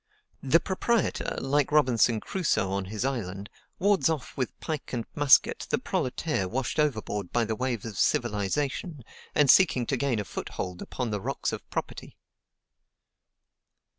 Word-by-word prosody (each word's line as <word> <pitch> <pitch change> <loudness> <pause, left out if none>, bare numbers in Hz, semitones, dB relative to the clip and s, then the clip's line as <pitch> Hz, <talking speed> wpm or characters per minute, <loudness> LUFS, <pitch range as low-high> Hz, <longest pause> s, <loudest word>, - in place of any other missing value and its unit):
The 140 +5 +4
proprietor, 205 +4 -1
like 140 +1 +1
Robinson 125 -6 +3
Crusoe 160 - 0
on 100 0 -1
his 110 +5 -3
island, 100 -7 -3 0.3
wards 200 -2 +3
off 155 -5 -3
with 130 -3 -3
pike 155 -5 -5
and 115 -2 -2
musket 145 -2 +4
the - - +2
proletaire 125 - -1
washed 130 +6 -2
overboard 110 -9 -1
by 120 -1 +1
the 110 0 -2
wave 125 -3 -2
of 105 -5 -6
civilization, 135 - 0 0.3
and 150 - +5
seeking 135 -6 +5
to 135 - -1
gain 135 -3 0
a 105 - -2
foothold 90 -1 -5
upon 125 -4 -4
the 105 -1 -2
rocks - - -2
of - - -7
property. - - -5
130 Hz, 145 wpm, -27 LUFS, 105-150 Hz, 0.3 s, and